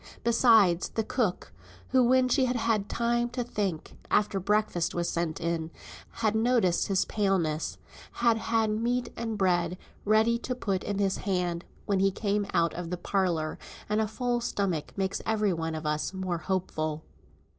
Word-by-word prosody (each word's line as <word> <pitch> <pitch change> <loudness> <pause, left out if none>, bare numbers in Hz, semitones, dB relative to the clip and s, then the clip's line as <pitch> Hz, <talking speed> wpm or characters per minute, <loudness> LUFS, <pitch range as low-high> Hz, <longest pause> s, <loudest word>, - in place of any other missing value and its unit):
Besides, 225 -7 +4
the 225 - -1
cook, 215 - -1 0.4
who, 260 0 +4
when 255 +1 +4
she 260 +1 +3
had 250 0 0
had 225 -4 0
time 240 0 0
to 245 0 -3
think, 200 -8 -3
after 205 -1 +2
breakfast 195 -3 0
was 170 0 0
sent 170 -2 -2
in, 165 -1 -2 0.4
had 220 -2 -1
noticed 220 -6 +2
his 195 -1 +2
paleness, 185 -7 0 0.4
had 235 -1 +3
had 225 -1 +1
meat 235 +3 -1
and 225 -2 -3
bread 180 -2 +1 0.3
ready 220 +3 +3
to 250 +1 -3
put 195 -6 -2
in 205 - -2
his 195 -1 +1
hand 180 -3 -1 0.2
when 200 -2 +1
he 195 +1 +4
came 200 +1 -1
out 170 0 +2
of 175 -1 -5
the 180 - -3
parlour; 175 -4 -1 0.3
and 210 +1 +1
a 215 - 0
full 240 +2 -1
stomach 195 -9 -2
makes 195 0 -1
every 215 -3 +1
one 165 -1 -3
of 155 0 -6
us 150 +5 -1
more 185 -2 -2
hopeful. 155 -3 -2
200 Hz, 165 wpm, -28 LUFS, 175-230 Hz, 0.4 s, Besides